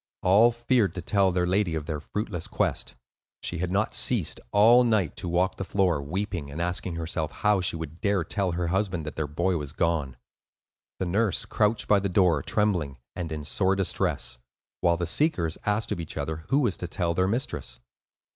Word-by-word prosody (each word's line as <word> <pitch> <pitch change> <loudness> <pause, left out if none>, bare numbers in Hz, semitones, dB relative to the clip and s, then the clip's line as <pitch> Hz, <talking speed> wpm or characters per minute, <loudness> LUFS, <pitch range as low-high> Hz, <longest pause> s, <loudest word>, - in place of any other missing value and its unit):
All 105 +6 +6
feared 120 -5 +1
to 90 - -3
tell 100 0 +2
their 90 0 +1
lady 90 -2 +1
of 75 -2 -3
their 75 -2 -3
fruitless 95 +2 -4
quest. - - -1 0.5
She 85 - -2
had 90 0 -1
not 100 +3 +1
ceased, 110 -11 +1
all 115 +4 +6
night, 110 -9 +1
to 90 - -4
walk 90 +2 +1
the - - -3
floor, 95 -6 +1
weeping, 85 0 -3
and 70 +3 -7
asking 90 0 -2
herself 80 -1 -3
how 105 -2 +2
she 90 - +1
would 80 0 -7
dare 100 -4 +1
tell 95 +1 -1
her 85 0 -1
husband 95 -3 -1
that 75 - -6
their 80 -2 -2
boy 85 +5 0
was 75 -2 -5
gone. 80 -7 0 0.8
The 95 - -2
nurse 100 +3 0
crouched 110 +1 +1
by 105 - +5
the 100 0 -2
door, 90 -5 +3
trembling, 90 -9 0 0.2
and 85 -3 -4
in 75 -1 -4
sore 95 +6 +1
distress; 95 -9 -1 0.4
while 85 -1 +2
the 85 - -1
seekers 85 - 0
asked 105 +1 0
of 100 - -1
each 80 -2 -6
other 80 0 -4
who 140 +2 +3
was 110 -9 0
to 90 - -4
tell 85 0 -1
their 95 +2 +1
mistress. 95 - -3
90 Hz, 195 wpm, -27 LUFS, 80-100 Hz, 0.8 s, All